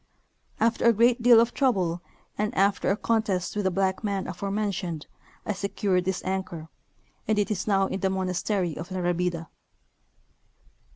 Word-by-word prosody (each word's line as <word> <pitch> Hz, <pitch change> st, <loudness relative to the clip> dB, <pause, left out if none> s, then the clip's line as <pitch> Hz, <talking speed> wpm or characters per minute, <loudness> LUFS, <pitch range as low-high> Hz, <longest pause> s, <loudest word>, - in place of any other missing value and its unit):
After 230 Hz, +1 st, +1 dB
a 235 Hz, -, +7 dB
great 235 Hz, +3 st, +3 dB
deal 235 Hz, -1 st, +7 dB
of 235 Hz, +1 st, +2 dB
trouble 185 Hz, -11 st, +1 dB, 0.3 s
and 210 Hz, 0 st, -2 dB
after 200 Hz, +1 st, +2 dB
a 195 Hz, -, +2 dB
con 225 Hz, 0 st, +1 dB
test 190 Hz, -4 st, -2 dB
with 205 Hz, -1 st, -1 dB
the -, -, +4 dB
black 190 Hz, +2 st, 0 dB
man 200 Hz, -2 st, -1 dB
aforementioned 195 Hz, -3 st, -3 dB, 0.4 s
I 210 Hz, -, -1 dB
secured 195 Hz, -2 st, -1 dB
this 190 Hz, 0 st, -2 dB
anchor, 185 Hz, -4 st, -4 dB, 0.6 s
and 215 Hz, 0 st, +2 dB
it 205 Hz, +1 st, +1 dB
is 195 Hz, -1 st, -2 dB
now 195 Hz, -2 st, +3 dB
in 190 Hz, 0 st, -3 dB
the 190 Hz, -, +1 dB
monastery 185 Hz, -2 st, -1 dB
of 170 Hz, +3 st, -7 dB
La 185 Hz, -, -4 dB
Rabida. 175 Hz, -1 st, -1 dB
195 Hz, 165 wpm, -26 LUFS, 180-210 Hz, 0.6 s, a